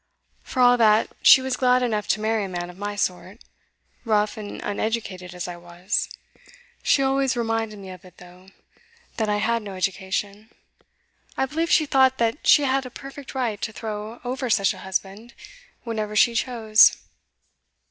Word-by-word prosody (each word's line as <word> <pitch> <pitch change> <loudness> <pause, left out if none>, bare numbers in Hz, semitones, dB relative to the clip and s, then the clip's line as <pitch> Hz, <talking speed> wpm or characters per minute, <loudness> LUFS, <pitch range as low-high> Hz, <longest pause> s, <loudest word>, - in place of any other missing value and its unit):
For 255 - -3
all 245 0 +6
that 220 -1 +3
she 265 - +8
was 260 -1 -2
glad 250 0 +2
enough 215 -4 -1
to - - +1
marry 220 -1 0
a - - -7
man 175 -1 -5
of 175 - -18
my 205 0 -4
sort 190 0 -3 0.7
rough 215 -2 +1
and 210 -2 -8
uneducated 200 -4 -4
as 180 +1 -5
I 175 -1 -7
was. 175 +4 -3 0.7
She 275 - +2
always 270 -1 +1
reminded 225 -2 -2
me 195 -2 -10
of 185 -2 -12
it, 180 -1 -17
though 180 +1 -16 0.7
that 220 -2 -1
I 205 - +1
had 230 +2 0
no 200 -2 -8
education; 195 +3 -3 0.9
I 265 - +1
believe 325 +5 -2
she 315 - +4
thought 265 -2 +3
that 230 +4 -1
she 295 - +6
had 270 -1 0
a - - -9
perfect 275 +1 -10
right 235 -6 -2
to - - -3
throw 215 +1 -6
over 255 +1 -3
such 200 -3 +2
a - - -12
husband, 195 +5 -5 0.5
whenever 215 -3 -4
she 235 +3 +4
chose. 225 -2 +4
220 Hz, 170 wpm, -23 LUFS, 195-250 Hz, 0.9 s, she